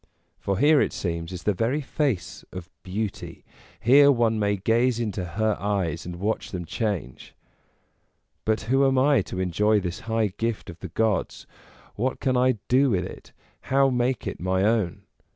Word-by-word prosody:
For 100 -1 -1
here, 145 +4 +5
it - - 0
seems, 85 -1 -3
is 90 -1 -7
the 105 - +2
very 115 +10 0
face 140 - -2
of 90 -2 -9
Beauty, 100 +2 -5 0.3
here 140 +4 +6
one 115 -4 +1
may 100 -1 +1
gaze 115 +4 +1
into 105 -5 -2
her 105 +5 0
eyes 95 -6 -2
and 90 - -5
watch 105 +5 -2
them 90 -2 -5
change. 85 - -4 1.1
But 110 0 0
who 135 +5 +2
am 135 0 +2
I 140 +2 +4
to 90 - -6
enjoy 105 +4 +2
this 90 -2 -4
high 110 -4 +1
gift 115 -5 -2
of 85 - -15
the - - -7
gods? 110 -5 -1 0.5
what 130 +5 -2
can 130 -1 0
I 125 -1 +3
do 135 +2 +4
with 95 -5 0
it, - - -11 0.3
how 135 0 +2
make 125 0 0
it - - -4
my 95 +1 0
own? 100 -3 0
110 Hz, 170 wpm, -25 LUFS, 95-125 Hz, 1.1 s, here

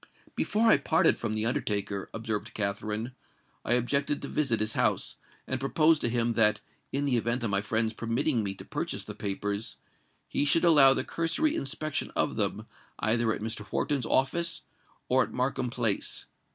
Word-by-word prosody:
"Before 215 +2 0
I 225 - +6
parted - - +2
from 110 - -2
the 110 0 -1
undertaker," 100 -4 -2
observed 110 -1 -4
Katherine, 105 +3 -2 0.5
"I 120 - +1
objected 140 +4 +1
to - - -3
visit 135 -7 0
his 110 +1 0
house, - - +1 0.3
and 130 - -3
proposed 155 +4 +3
to 120 - +1
him 120 0 +1
that, 105 -2 +4 0.3
in 140 +1 -1
the 130 -4 +2
event 120 +2 -1
of 110 - -1
my 100 0 +3
friends 110 +1 0
permitting 115 +3 0
me 100 -2 -3
to - - -11
purchase - - -3
the - - -7
papers, 100 +2 -3 0.5
he - - 0
should 165 +4 +3
allow 140 -5 +7
the - - 0
cursory 170 - 0
inspection 140 +2 -3
of - - +1
them - - -1 0.3
either 115 +1 +1
at 105 - -3
Mr. 110 -1 -4
Wharton's 140 -6 0
office 165 +6 0 0.4
or 130 +1 +3
at - - -2
Markham 125 0 -1
Place. 115 -4 -1
120 Hz, 175 wpm, -28 LUFS, 110-140 Hz, 0.5 s, allow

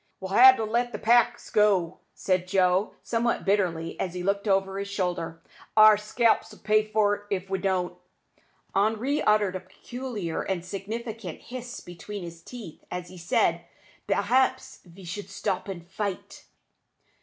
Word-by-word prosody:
"We'll 190 0 -6
ha' 260 +4 +9
to 225 - -3
let 240 +3 0
the - - -2
packs 235 +1 +2
go," 200 -6 +2 0.2
said 185 -1 0
Joe, 185 +1 +2
somewhat 235 0 0
bitterly, 180 -5 0
as 185 -1 -3
he 180 - -4
looked 200 +2 0
over 195 0 +1
his 200 - -4
shoulder. 175 -4 -3 0.3
"Our 215 0 +9
scalps'll 215 +2 +1
pay 215 0 +3
for't, 205 -1 +1
if 195 -1 -3
we 190 - 0
don't." 185 -2 -1 0.8
Henri 225 +8 +1
uttered 210 -3 +2
a - - -2
peculiar 200 0 -5
and 180 -3 -3
significant 215 0 -6
hiss 245 0 -8
between 190 +3 -8
his 170 -1 -9
teeth, 215 -4 -10
as 180 -1 -5
he 185 - -12
said, 170 - +1 0.4
"P'r'aps 260 +1 +1
ve 185 +2 -15
better 190 +3 -6
stop 195 -1 -3
and 175 -3 -7
fight!" 195 0 -5
200 Hz, 150 wpm, -27 LUFS, 180-220 Hz, 0.8 s, ha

